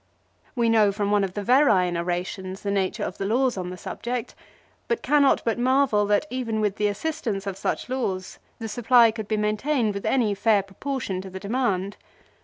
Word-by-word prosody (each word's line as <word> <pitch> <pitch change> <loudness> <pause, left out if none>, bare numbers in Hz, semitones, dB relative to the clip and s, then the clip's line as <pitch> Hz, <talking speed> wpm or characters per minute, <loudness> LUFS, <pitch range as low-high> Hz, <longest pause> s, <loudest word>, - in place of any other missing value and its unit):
We 235 -2 +2
know 220 -3 +4
from 205 0 -2
one 205 -1 +3
of 185 -1 -3
the 205 - -3
Verrine 200 -8 +4
orations 180 +2 -3
the 200 - -1
nature 195 -2 -1
of - - -5
the 195 - -2
laws 250 +3 +1
on 180 -2 -4
the 180 - -7
subject; 240 +6 -5 0.5
but 465 - -1
cannot 285 0 +3
but 230 +1 0
marvel 255 -5 +3
that 205 +7 +2
even 235 -4 -2
with 210 -2 0
the 210 - +2
assistance 210 -3 -3
of 195 -2 -3
such 195 - -3
laws 200 -8 -3 0.2
the 225 - -5
supply 235 +1 +4
could 220 -2 -6
be 215 - 0
maintained 215 +3 0
with 200 - -4
any 235 -6 +2
fair 205 0 +2
proportion 200 -1 -4
to 190 - -9
the 190 0 -7
demand. 200 -3 -1
210 Hz, 195 wpm, -24 LUFS, 195-245 Hz, 0.5 s, know